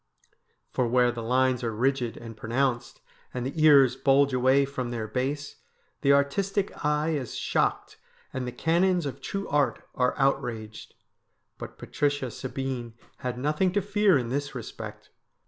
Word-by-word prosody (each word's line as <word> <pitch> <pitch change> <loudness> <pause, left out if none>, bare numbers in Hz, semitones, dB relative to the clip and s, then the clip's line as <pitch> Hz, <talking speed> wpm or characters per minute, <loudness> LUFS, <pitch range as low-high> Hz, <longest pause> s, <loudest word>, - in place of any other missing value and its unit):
For 125 - 0
where 125 +1 +3
the 120 -1 -6
lines 130 +2 +1
are 115 - 0
rigid 125 0 0
and 115 -1 -9
pronounced, 120 +3 -1 0.3
and 125 -1 -2
the 155 +4 -2
ears 140 -5 +7
bulge 140 0 +3
away 130 +2 +4
from 130 -3 -4
their 115 -2 -3
base, 135 +5 -3 0.4
the 140 - +4
artistic 190 +9 +1
eye 150 +1 +1
is 140 -6 -3
shocked - - -1 0.4
and 130 -1 -3
the - - -3
canons 175 +4 +2
of 140 - -5
true 195 0 -4
art 145 -1 0
are 125 -1 +1
outraged. 120 -6 -2 0.6
But - - -8
Patricia 145 -4 -1
Sabine 130 -1 -5 0.2
had 125 -2 -4
nothing 150 +8 +1
to 205 - +2
fear 205 -3 +3
in 120 -3 -2
this 145 +2 -3
respect. 120 - -8
135 Hz, 150 wpm, -27 LUFS, 125-145 Hz, 0.6 s, ears